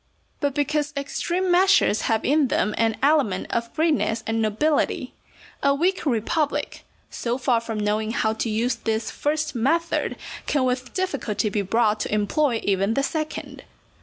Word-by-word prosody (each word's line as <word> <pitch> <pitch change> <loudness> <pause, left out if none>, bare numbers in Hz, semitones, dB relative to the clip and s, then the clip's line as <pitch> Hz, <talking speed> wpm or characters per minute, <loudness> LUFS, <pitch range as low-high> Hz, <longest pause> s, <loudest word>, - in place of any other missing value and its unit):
But 285 -2 -1
because 295 +1 0
extreme 350 +6 -1
measures 370 - +4
have 220 -1 +1
in 290 0 +3
them 210 - 0
an 225 -1 +1
element 275 -11 +2
of 235 0 -2
greatness 305 -8 +1
and 225 0 0
nobility, 255 +8 0 0.5
a 280 0 +3
weak 350 +2 0
republic, 285 +5 -1 0.3
so 240 +1 -2
far 245 -3 +1
from 225 -2 -4
knowing 210 +1 0
how 220 -1 0
to 225 +1 -2
use 230 +3 +1
this 225 -1 -2
first 305 +1 -1
method, 325 +8 0 0.3
can 285 -3 +1
with 255 0 -2
difficulty 280 - -1
be 205 0 -1
brought 215 +2 +1
to - - -3
employ 225 +4 +1
even 200 +2 +1
the 275 - +1
second. 310 +1 -4
250 Hz, 155 wpm, -24 LUFS, 220-300 Hz, 0.5 s, measures